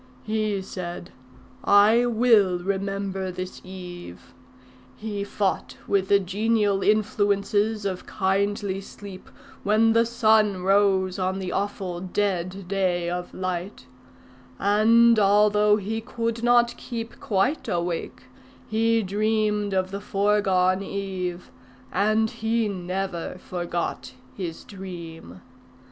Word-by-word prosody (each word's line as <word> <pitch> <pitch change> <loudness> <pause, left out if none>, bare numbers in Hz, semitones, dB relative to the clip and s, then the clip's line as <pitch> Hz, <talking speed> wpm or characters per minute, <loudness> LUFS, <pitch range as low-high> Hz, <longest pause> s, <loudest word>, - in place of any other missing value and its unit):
He 215 -2 -1
said, 175 -1 -7 0.5
'I 215 +4 +5
will 220 -6 +4
remember 195 0 -3
this 185 0 -6
eve.' 175 - -10 0.6
He 210 -2 -4
fought 200 -1 -2
with 195 -1 +1
the 200 - +5
genial 205 +1 +1
influences 210 0 +1
of 185 -2 -3
kindly 195 0 -1
sleep 195 -1 -11 0.3
when 220 +2 +3
the 230 0 +3
sun 215 -5 +3
rose 195 -1 +2
on 185 +1 -1
the 185 -2 -4
awful 195 -3 -3
dead 185 -1 -2
day 180 -3 0
of 180 0 -4
light; 185 -4 -4 0.7
and 225 +3 +5
although 210 +1 +4
he 220 +2 -3
could 230 0 -3
not 240 0 +3
keep 230 -1 -6
quite 215 +9 0
awake, 170 -5 -3 0.4
he 225 +1 +2
dreamed 210 +1 0
of 185 0 0
the 200 0 -5
foregone 195 -2 +2
eve, 190 -3 -4 0.4
and 215 +4 +2
he 225 0 0
never 185 -2 -4
forgot 175 -8 -4 0.2
his 170 -4 -5
dream. 170 - -9
200 Hz, 110 wpm, -25 LUFS, 185-215 Hz, 0.7 s, I